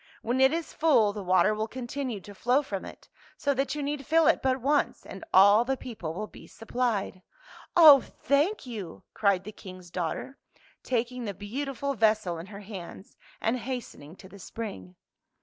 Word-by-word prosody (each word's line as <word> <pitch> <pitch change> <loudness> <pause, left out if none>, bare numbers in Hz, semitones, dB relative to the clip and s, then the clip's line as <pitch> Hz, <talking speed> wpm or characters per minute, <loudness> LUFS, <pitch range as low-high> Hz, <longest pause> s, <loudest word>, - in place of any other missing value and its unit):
When 245 +3 0
it 265 +1 +6
is 330 0 -3
full, 235 -10 +3
the 210 - -5
water 185 +3 +3
will 215 +1 -2
continue 250 -1 -5
to 205 - -12
flow 250 +8 +1
from 195 -8 -5
it, - - -12 0.3
so 285 - +1
that 270 +1 -1
you 295 - -3
need 285 0 -3
fill 325 +3 +3
it - - +4
but 260 0 +1
once 285 +4 0
and 190 - -9
all 205 +4 +7
the 265 +2 -1
people 180 -12 -6
will 210 +3 -3
be - - -14
supplied." 225 -5 -2 0.3
" - - -17 0.2
Oh, 300 -5 +10
thank 290 +7 0
you! 200 - -7
" - - -61
cried 200 -3 +2
the 215 - -8
King's 185 -4 -12
daughter, 180 +10 -4 0.4
taking 245 0 -2
the 200 -2 -4
beautiful 275 +7 -4
vessel 215 -8 +1
in 170 - -8
her 200 +1 -10
hands, 195 -2 -10 0.2
and 235 +3 0
hastening 230 - -7
to 190 - -14
the 200 +2 -14
spring. 95 - -7
225 Hz, 185 wpm, -28 LUFS, 195-265 Hz, 0.4 s, Oh